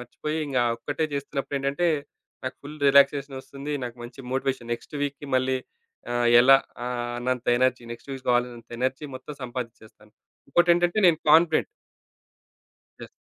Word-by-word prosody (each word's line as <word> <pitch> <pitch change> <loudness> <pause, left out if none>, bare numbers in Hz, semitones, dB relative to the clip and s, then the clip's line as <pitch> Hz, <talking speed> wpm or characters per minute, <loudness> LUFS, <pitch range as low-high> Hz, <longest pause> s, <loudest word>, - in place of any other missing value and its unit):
మర్చిపోయి 150 +6 -5
ఇంగ 140 -2 -4 0.2
ఒక్కటే 145 +7 -2
చేస్తున్నప్పుడు 140 0 -3
ఏంటంటే 140 +6 0 0.6
నాకు 130 - -4
ఫుల్ 150 +2 -9
రిలాక్సేషన్ 140 0 +4
వస్తుంది. 140 +2 -7
నాకు 120 -1 -7
మంచి 125 +3 -10
మోటివేషన్. 130 -3 -2
నెక్స్ట్ 120 - -10
వీక్‌కి 145 0 -4
మళ్ళీ 130 +1 +1 0.6
ఆహ్, 120 0 +2
ఎలా 135 +2 +8 0.3
ఆహ్, 120 -1 -3
అన్నంత 125 0 -2
ఎనర్జీ, 130 -1 +2
నెక్స్ట్ 120 +4 -11
వీక్ 135 -1 -8
కావాలన్నంత 120 -1 -1
ఎనర్జీ 130 +3 -1
మొత్తం 130 +3 -8
సంపాదించేస్తాను. 115 -4 -8 0.4
ఇంకోటెంటంటే 175 +4 +3
నేను 165 -3 +4
కాన్ఫిడెంట్. 160 +1 +5 1.4
యెస్. - - -10
135 Hz, 135 wpm, -25 LUFS, 125-145 Hz, 1.4 s, ఎలా